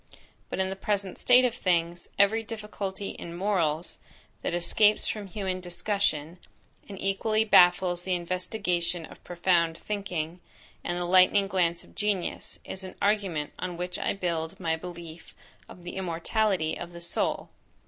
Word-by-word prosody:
But - - -3
in 190 0 0
the - - -3
present 195 -1 -2
state 250 +1 +6
of 245 - +1
things, 175 -4 0
every 200 +3 +4
difficulty 210 -3 -5
in 170 0 -7
morals, 175 -5 0 0.4
that - - -1
escapes 205 +5 +4
from 210 -2 -3
human 190 -1 -3
discussion, 175 -3 -1 0.5
and 195 -2 -7
equally 215 +3 +1
baffles 180 -3 +5
the 185 0 0
investigation 180 -1 -2
of - - -15
profound 170 -2 +1
thinking, 180 -5 -4 0.4
and 175 - -2
the 175 - -1
lightning 185 +2 +5
glance 175 -3 +1
of - - -19
genius, 205 -4 -2
is 190 - -6
an 185 - -8
argument 195 -8 0
on 180 -2 -4
which 180 +1 -3
I - - 0
build 170 -4 -3
my 165 -1 0
belief 170 -1 -9 0.3
of 180 - -12
the 175 - -7
immortality 185 0 0
of 175 0 -7
the 170 - -9
soul. 170 - -1
180 Hz, 150 wpm, -28 LUFS, 170-200 Hz, 0.5 s, state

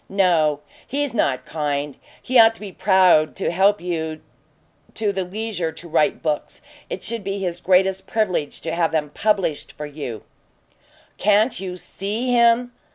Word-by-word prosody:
"No. 165 -7 +2 0.3
He's 285 0 -2
not 140 - 0
kind. 145 -2 -3 0.2
He 255 -1 +2
ought 225 0 +7
to - - -14
be 205 -2 -7
proud 185 -5 +4
to 195 - -1
help 195 +4 +3
you 160 -3 -4 0.7
to 215 -2 0
the 190 -1 -1
leisure 185 -3 -3
to 170 - -10
write 155 -2 +1
books; 150 -2 -3 0.3
it - - -5
should 230 -3 -2
be 195 +1 -3
his 180 -3 -3
greatest 190 +1 +2
privilege 185 -10 -1
to 165 - -4
have 170 -1 +1
them 150 -2 -1
published 195 -8 0
for 150 - -7
you 140 -7 -7 0.5
" - - -33
"Can't 210 +4 +3
you 185 -1 -5
SEE 210 +7 -3
him?" 240 0 +4
185 Hz, 160 wpm, -22 LUFS, 160-210 Hz, 0.7 s, ought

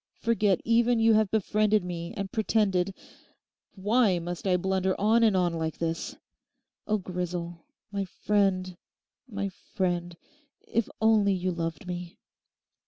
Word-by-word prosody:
Forget 215 -5 +1
even 235 +1 +3
you 225 0 +5
have 215 -2 +3
befriended 215 -1 +2
me 170 -1 -5
and 200 -2 -4
pretended—Why 205 +1 -1
must 175 +2 -5
I 180 -1 +3
blunder 190 +1 0
on 220 +3 +4
and 215 -4 +4
on 175 -2 +1
like 160 -1 -3
this? 165 0 -3 0.7
Oh, 215 - +2
Grisel, 175 -2 -4 0.3
my 200 -1 -2
friend, 185 -1 0 0.5
my 200 -4 -3
friend, 175 -2 -3 0.5
if 230 -1 0
only 215 -3 +4
you 185 0 -1
loved 165 -1 -4
me! 180 -1 -6
190 Hz, 125 wpm, -28 LUFS, 175-215 Hz, 0.7 s, you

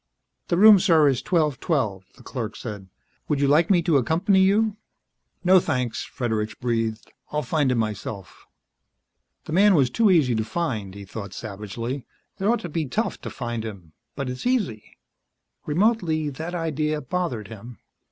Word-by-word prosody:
"The 170 - +1
room, 210 +1 +8
sir, 165 -5 +4
is 130 -3 0
1212," 140 - 0
the - - -17
clerk 115 -4 -5
said. 100 -5 -7 0.4
"Would 145 - 0
you 140 - +2
like 155 +4 +4
me 175 -4 +4
to 160 -3 +3
accompany 180 - +2
you 210 +2 +3 0.3
" - - -48
"No 185 +1 +6
thanks," 125 -7 -2
Fredericks 110 -4 -3
breathed. 115 -3 -2 0.2
"I'll 150 0 -1
find 140 +1 +1
it - - +1
myself." 105 -3 -4 1.0
The 155 - -6
man 200 +2 +5
was 135 -5 +3
too 225 -2 +3
easy 155 -9 +4
to 110 -1 0
find, 110 - -3
he 100 0 -9
thought 100 +1 -8
savagely. 110 +5 -6 0.3
It 195 - -2
ought 235 +3 +2
to 175 - -6
be 155 -1 -2
tough 210 - -2
to - - -6
find 120 -3 -4
him 95 -8 -9 0.2
but 140 - -3
it's 125 - -4
easy. 205 - -2 0.7
Remotely, 160 -4 +1
that 160 +6 -6
idea 155 -2 -1
bothered 130 - -3
him. 115 +2 -10
140 Hz, 165 wpm, -24 LUFS, 115-175 Hz, 1.0 s, room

